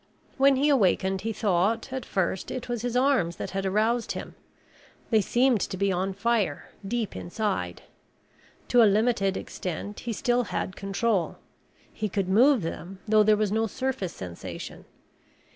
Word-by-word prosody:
When 275 0 +5
he 275 +3 +2
awakened 190 -6 +2
he 225 - -2
thought, 215 +4 0
at 260 -2 -4
first, 190 -1 -1
it 255 - -5
was 240 -2 -2
his 245 0 -1
arms 250 -11 +2
that - - -5
had 195 0 -2
aroused 220 +4 +1
him. - - -7 0.8
They 220 -2 +5
seemed 240 +1 +2
to 190 - -3
be 200 +1 +1
on 190 +1 -1
fire, 210 -7 0
deep 225 +2 -2
inside. 175 - -3 0.9
To 245 - +6
a 220 - +7
limited 205 -2 +2
extent, 190 +4 -5
he 240 - -4
still 245 +2 +1
had 185 - -3
control. 195 -1 -1 0.6
He 215 -1 -3
could 195 -1 -1
move 245 - +5
them 175 +3 -6
though 215 0 +5
there 210 0 +4
was 210 -2 0
no 225 +1 +1
surface 255 -5 -3
sensation. 90 -2 -8
210 Hz, 160 wpm, -27 LUFS, 190-240 Hz, 0.9 s, a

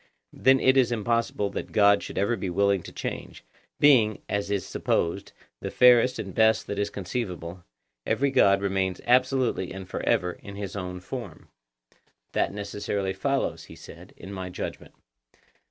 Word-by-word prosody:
Then 130 0 +4
it 130 +1 +4
is 125 -2 +4
impossible 115 -2 -1
that - - -6
God 100 -1 +5
should - - -8
ever 100 +5 +1
be 95 - -4
willing 100 +1 +2
to - - -10
change; - - -6 0.4
being, 115 -8 +4
as 100 0 -2
is 100 -2 -1
supposed, 85 +4 -1 0.3
the - - -5
fairest 125 +1 +5
and 95 -3 -6
best 110 0 +3
that 100 - -4
is 100 0 0
conceivable, 90 -4 -5 0.4
every 140 - +1
God 100 -6 +4
remains 95 -2 -1
absolutely 125 -6 +2
and 95 0 -8
for - - -5
ever 90 0 +1
in 100 +2 -11
his 100 -2 -6
own 90 -2 -5
form. 105 -4 -8 0.8
That - - 0
necessarily 100 -1 -3
follows, 135 +8 -2
he - - -13
said, - - -13
in 95 - -9
my 95 -1 -5
judgment. 90 - -7
100 Hz, 160 wpm, -26 LUFS, 95-120 Hz, 0.8 s, God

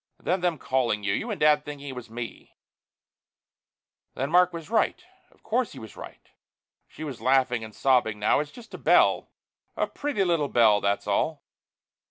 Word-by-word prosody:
And - - -27
then 180 +1 +1
them 175 -3 0
calling 125 -6 0
you, 100 -1 0
you 230 - -2
and 210 - -3
Dad 150 -1 +4
thinking 145 -1 -8
it - - -4
was 125 -2 -8
me 115 +1 -8 0.7
" - - -64
"Then 135 +3 -2
Mark 180 +1 +5
was 165 -2 -7
right. 225 - +2 0.3
Of - - -29
course 240 +1 -1
he 135 - -10
was 110 -2 -11
right." - - -11 0.6
She 155 - -10
was 140 -6 -6
laughing 130 -3 +2
and 110 -2 -10
sobbing 125 -5 +2
now. 105 +5 +2
"It's 150 0 -3
just 230 +7 -14
a - - -7
bell, - - +3 0.5
a - - +2
pretty 285 -9 -2
little 165 -6 +1
bell, 110 -4 +4
that's 100 0 0
all." 140 +9 -1
140 Hz, 190 wpm, -26 LUFS, 115-170 Hz, 0.7 s, Mark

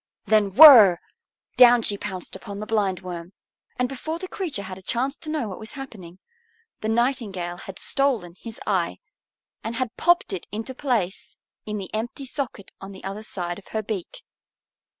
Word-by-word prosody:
Then 205 -3 +2
whirr! 235 - +10 0.6
Down 245 -1 +7
she 205 - +4
pounced 190 -3 -6
upon 200 +1 -8
the 215 - -5
Blindworm. 185 -4 -2 0.4
And 250 - +1
before 295 +5 -5
the 370 +2 -7
creature 335 - -2
had 190 -1 -8
a - - -16
chance 260 +7 0
to 310 - -9
know 305 -7 -2
what 190 - -7
was 220 +4 -9
happening, 210 - -10 0.6
the 215 - -3
Nightingale 220 -7 -1
had 185 +3 -9
stolen 245 -11 0
his 230 -1 -8
eye, 185 -5 0 0.7
and 225 +1 -4
had 240 -1 -3
popped 345 - +3
it 185 - -5
into 225 +5 -5
place 240 -9 -2 0.3
in 210 0 -3
the 195 -2 -7
empty 240 +6 -4
socket 260 -7 -5
on 195 +1 -8
the 190 - -13
other 195 +2 -5
side 175 -4 -5
of 200 - -19
her 215 - -1
beak. 200 -4 -6
215 Hz, 170 wpm, -24 LUFS, 190-250 Hz, 0.7 s, whirr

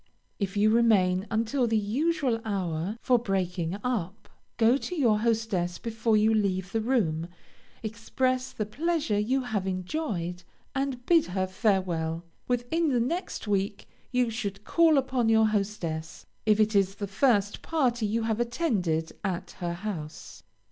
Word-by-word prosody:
If 200 -1 -2
you 215 +1 +4
remain 205 -5 +3
until 230 +3 +1
the 225 -1 +2
usual 250 - 0
hour 190 -1 -2
for 250 -2 +4
breaking 185 -4 -1
up, 210 -4 -3 0.3
go 230 +2 +5
to 360 +6 -4
your 235 -9 +3
hostess 220 -6 0
before 225 -1 0
you 215 +1 +4
leave 190 -3 0
the 225 - 0
room, 180 -10 0 0.6
express 255 +4 -1
the 215 - -3
pleasure 290 -2 0
you 255 +6 +1
have 210 -6 -2
enjoyed, 185 - -3 0.3
and 270 -3 -2
bid 335 -3 +4
her 185 +1 -1
farewell. 185 -5 0 0.2
Within 250 +7 0
the 250 -3 +2
next 295 - -2
week, 200 0 -1 0.2
you 250 -2 +2
should 205 -3 -4
call 325 +3 +4
upon 260 -3 +1
your 220 0 +5
hostess, 195 -7 -2 0.2
if 215 0 +4
it 215 0 +3
is 195 -1 +3
the 205 - -4
first 205 0 +1
party 245 -8 0
you 225 +2 0
have 225 0 0
attended 215 - 0
at 185 -4 -3
her 175 -2 -2
house. 170 -5 -6
215 Hz, 150 wpm, -28 LUFS, 190-245 Hz, 0.6 s, go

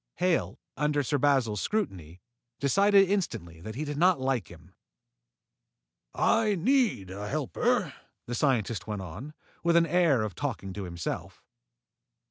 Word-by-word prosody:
Hale, 180 -1 0 0.2
under 150 -1 +1
Sir 145 +2 0
Basil's 130 -7 +2
scrutiny, 90 - -3 0.4
decided 195 +7 +4
instantly 90 - -2
that 110 +4 -7
he 150 +4 -3
did 145 -1 -4
not 180 0 +4
like 130 -7 -1
him. - - -15 1.4
"I 220 -2 +3
need 210 - +1
a 100 +2 -6
helper," 155 - 0 0.3
the 120 - -5
scientist 115 -5 0
went 105 -3 -4
on, 110 - -8 0.3
with 170 0 +3
the 170 0 +5
air 160 -8 +3
of 105 -3 -4
talking 95 +3 -4
to 100 -1 -5
himself. 85 -2 -5
140 Hz, 135 wpm, -28 LUFS, -, 1.4 s, the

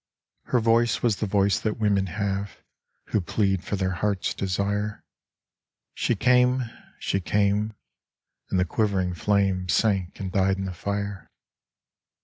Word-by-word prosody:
Her 125 - +2
voice 115 +1 +2
was 115 -4 +2
the 105 - -2
voice 100 -3 +2
that 110 +1 -2
women 100 -3 +2
have, 100 +2 -3 0.5
Who 105 - +1
plead 95 +1 0
for 100 - -2
their 95 -1 0
heart's 95 +2 -1
desire. 100 +3 -2 0.9
She - - 0
came 125 +1 +3 0.3
she 95 - -1
came 105 +3 +1 0.7
and 95 - +1
the 90 - +3
quivering 95 -2 0
flame 95 +1 +1
Sank 95 +1 +1
and 95 -2 -4
died 95 +1 +2
in 95 - -3
the 95 - -4
fire. 100 +2 -4
100 Hz, 135 wpm, -25 LUFS, 95-105 Hz, 0.9 s, came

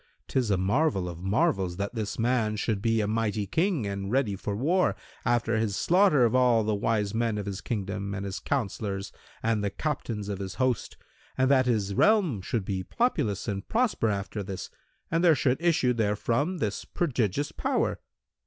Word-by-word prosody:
'tis 125 -4 0
a 100 - +3
marvel 100 - +1
of 85 -1 -7
marvels 95 - +1
that 100 +3 -3
this 110 -3 -3
man 115 -2 +1
should 105 -1 -1
be 115 0 +2
a 105 - 0
mighty 110 -1 0
King 160 - 0
and 100 0 -3
ready 125 -6 +1
for 100 +1 -4
war, 170 - +2 0.3
after 120 -1 +1
his 110 -2 0
slaughter 175 - +4
of 115 - +1
all 125 -3 +4
the 110 0 0
wise 105 -1 0
men 115 -1 0
of 105 - -3
his 100 -2 -4
kingdom 100 -2 -3
and 100 0 -4
his 95 -1 -4
counsellors 100 -6 -2 0.3
and 110 -2 +1
the 100 - +1
captains 115 -5 -3
of 100 -2 -4
his 95 -1 -5
host 130 -3 -1 0.4
and 130 +1 +3
that 130 -2 +4
his 105 -5 +1
realm 180 - +3
should 100 +1 -2
be 95 -2 -2
populous 105 - -1
and 100 -2 -4
prosper 225 - +1
after 100 +1 -3
this 95 -1 -6 0.4
and 165 +1 +2
there 165 -3 +6
should 130 +1 +1
issue 160 -8 +3
therefrom 115 - 0
this 105 -9 -2
prodigious 140 - -1
power! - - -1
110 Hz, 180 wpm, -27 LUFS, 100-130 Hz, 0.4 s, there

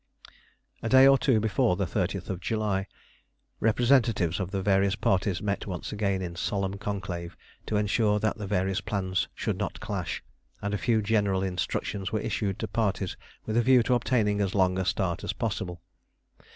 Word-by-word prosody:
A 115 - -2
day 130 +2 +8
or 135 0 +8
two 135 -5 +3
before 100 -4 +2
the 95 +1 -1
30th 95 -1 -2
July, 100 -1 -1 0.7
representatives 115 -6 +3
of 95 -2 -2
the 95 -1 -2
various 100 0 +3
parties 95 -2 0
met 100 0 -2
once 90 -3 -5
again 100 -3 -1
in 85 -1 -5
solemn 100 +2 -2
conclave 90 -4 -4 0.3
to 105 - 0
ensure 105 +1 +2
that 110 +1 -1
the 105 - -4
various 95 +1 0
plans 95 -3 -1
should - - -2
not - - -3
clash, - - -4 0.4
and 100 0 -3
a - - +1
few 115 -3 +2
general 100 -3 +1
instructions 95 +1 -2
were 110 - 0
issued 100 -2 -2
to 110 - -3
parties 100 -3 -1 0.3
with 110 - -2
a 120 - +5
view 125 0 +5
to 125 - +1
obtaining 110 -4 +1
as 95 -1 -1
long 95 -1 +3
a 95 - 0
start 90 0 -1
as - - -2
possible. 95 -6 -3
100 Hz, 175 wpm, -28 LUFS, 95-110 Hz, 0.7 s, day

